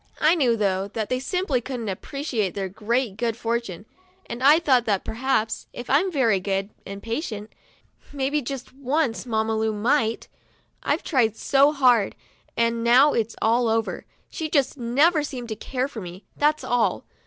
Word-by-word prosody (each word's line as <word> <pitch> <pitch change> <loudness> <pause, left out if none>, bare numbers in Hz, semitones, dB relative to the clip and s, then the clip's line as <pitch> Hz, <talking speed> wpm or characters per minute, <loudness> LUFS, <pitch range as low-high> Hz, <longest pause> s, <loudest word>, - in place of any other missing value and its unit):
I 310 +1 +5
knew, 255 -9 +2
though, 195 -2 0
that 220 -2 -2
they 255 - 0
simply 295 -2 -1
couldn't 245 -3 -5
appreciate 220 - -3
their 195 -1 -2
great 215 +2 -2
good 230 -1 -1
fortune, 230 -5 -3 0.4
and 235 +1 -7
I 290 +4 +7
thought 260 -8 +3
that 200 -3 0
perhaps, 225 -2 -1
if 245 +1 -6
I'm 345 +8 +3
very 235 - +2
good 195 +1 -2 0.2
and 200 +1 -8
patient, 225 -3 -4 0.6
maybe 285 +1 -1
just 260 0 -6
once 265 -2 -1
Mamma 220 -1 0
Lu 220 0 0
might. 225 +1 +1 0.5
I've - - -1
tried 225 - +1
so 280 +1 +4
hard, 250 -8 +3 0.4
and 230 0 +1
now 250 +5 +6
it's 225 0 -1
all 235 +2 +3
over. 225 0 -1 0.2
She 315 -1 -5
just 280 -4 +1
never 285 +7 +3
seemed 255 -5 -6
to 220 - -3
care 255 +4 -3
for 240 -6 -8
me, 180 +2 -9
that's 300 +1 +1
all. 245 -1 0
235 Hz, 165 wpm, -24 LUFS, 220-275 Hz, 0.6 s, I